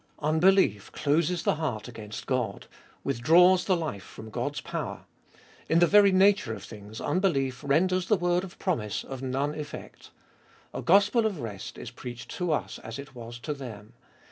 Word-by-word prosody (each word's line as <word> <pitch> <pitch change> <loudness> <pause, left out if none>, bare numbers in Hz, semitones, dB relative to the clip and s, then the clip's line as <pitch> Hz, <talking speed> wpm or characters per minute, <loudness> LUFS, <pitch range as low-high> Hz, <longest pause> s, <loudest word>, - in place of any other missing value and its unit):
Unbelief 155 - +3
closes 165 +4 +1
the - - +1
heart 125 -9 -3
against 110 -3 -8
God, 130 -3 -2 0.4
withdraws 175 +9 +5
the 185 -3 +2
life 155 - -4
from 110 +3 -11
God's 125 +6 -2
power; - - -5 0.6
in 165 - +4
the 175 - +6
very 200 +2 +6
nature 190 - +4
of - - -10
things 105 0 -10
unbelief 140 -9 0
renders 180 +6 +2
the 215 - +4
word 175 +1 +1
of 190 - -9
promise 115 - -2
of 135 -1 -7
none 135 +3 -1
effect. 150 -1 -8 0.6
A - - -4
gospel 205 +5 +4
of 195 -7 -4
rest 105 -4 -7
is - - -7
preached 120 -2 -8
to 180 -2 -1
us 150 - -2
as 110 +2 -7
it 140 -1 -9
was 120 -1 -8
to 150 - -3
them. 115 -5 -9
150 Hz, 170 wpm, -28 LUFS, 120-180 Hz, 0.6 s, the